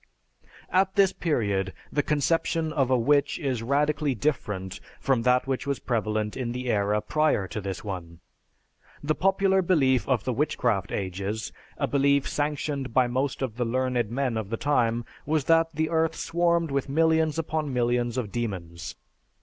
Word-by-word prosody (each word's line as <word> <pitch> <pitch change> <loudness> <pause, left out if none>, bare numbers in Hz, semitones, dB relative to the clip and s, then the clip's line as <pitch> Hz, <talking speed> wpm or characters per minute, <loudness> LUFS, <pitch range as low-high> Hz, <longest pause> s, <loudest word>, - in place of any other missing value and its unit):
_) - - -30 0.3
At 190 +1 +2
this 195 -2 +4
period 100 - -1 0.2
the 145 - +3
conception 155 +2 0
of 135 -4 +1
a 130 - +4
witch 140 +4 +2
is 130 -7 -2
radically 145 +2 +1
different 100 -8 -2 0.2
from 130 -4 +1
that 125 +1 +3
which 135 0 -2
was 140 -1 0
prevalent 110 -3 -1
in 120 -3 -3
the 125 0 -2
era 105 0 +1
prior 155 -11 +1
to 105 - -4
this 95 -1 -5
one. 85 -5 -6 0.8
The 155 +1 +1
popular 190 +2 +2
belief 140 -9 +2
of 125 -6 +2
the 130 - -1
witchcraft 115 - 0
ages, 100 +3 -3 0.2
a - - +1
belief 140 0 +2
sanctioned 145 -3 -2
by 130 - +5
most 130 +2 -1
of 120 -4 -4
the 120 - 0
learned 125 -2 0
men 125 -1 -1
of 110 -3 -4
the 115 - -2
time, 120 -3 +1 0.2
was 155 -1 +1
that 165 0 +4
the 155 +1 0
earth 160 0 +1
swarmed 170 -2 +1
with 140 0 -1
millions 160 +1 +2
upon 155 -2 -2
millions 120 -1 0
of 110 -6 -2
demons. 90 -8 -4
130 Hz, 165 wpm, -26 LUFS, 110-150 Hz, 0.8 s, by